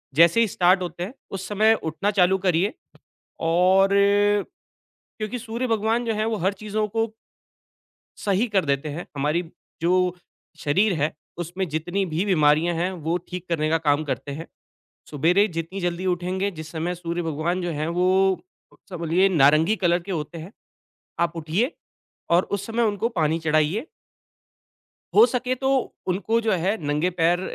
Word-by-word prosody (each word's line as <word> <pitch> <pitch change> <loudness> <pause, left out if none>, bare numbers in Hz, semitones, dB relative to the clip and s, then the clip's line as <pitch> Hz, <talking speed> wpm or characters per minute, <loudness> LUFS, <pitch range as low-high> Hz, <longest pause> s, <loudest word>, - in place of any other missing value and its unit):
जैसे 170 +7 +6
ही 230 - +3
स्टार्ट 185 -1 +3
होते 175 -1 -4
हैं 200 +7 -6 0.2
उस 190 - -7
समय 215 +2 +4
उठना 165 +6 -1
चालू 180 +1 +5
करिए 185 +5 +2 0.8
और 185 +3 +4 1.3
क्योंकि 215 +3 -4
सूर्य 235 +2 -3
भगवान 225 +1 0
जो 225 - 0
है 215 +1 0
वो 225 0 0
हर 195 - +2
चीज़ों 215 0 -1
को 225 +2 0 1.2
सही 200 +3 +2
कर 195 -4 +1
देते 140 +1 -1
हैं 155 +4 -6
हमारी 150 +5 0 0.4
जो 170 +2 +2 0.7
शरीर 190 +7 +2
है 150 +2 +1 0.3
उसमें 175 +2 -3
जितनी 175 +6 -1
भी 165 +5 0
बीमारियाँ 160 -2 +3
हैं 175 +3 0 0.2
वो 165 +2 +1
ठीक 180 0 -6
करने 155 -2 0
का 165 - +3
काम 150 -1 +1
करते 140 0 -4
हैं। 160 +4 -7 0.6
सुबेरे 170 +8 +3
जितनी 165 +4 -4
जल्दी 175 +1 -2
उठेंगे, 185 +2 -1
जिस 160 -4 -9
समय 170 +2 -2
सूर्य 170 0 -4
भगवान 165 +3 -2
जो 175 - -2
हैं 155 0 -2
वो 185 +2 +2 0.3
कौन-सा 185 - -11
बोलिए 170 +3 +2
नारंगी 160 +4 +4
कलर 175 -3 +2
के 195 +2 -6
होते 160 +1 -4
हैं, 165 +6 -9 0.7
आप 170 0 0
उठिए 170 - -1 0.6
और 170 +2 +4
उस 200 0 -2
समय 230 +1 0
उनको 215 +1 0
पानी 165 -6 0
चढ़ाइए। 160 - +1 1.3
हो 440 - +8
सके 250 - -1
तो 265 +1 -2 0.4
उनको 205 +5 +1
जो 225 -1 0
है 190 +4 +1
नंगे 150 +5 +1
पैर 170 +2 +3
180 Hz, 160 wpm, -24 LUFS, 165-200 Hz, 1.3 s, हो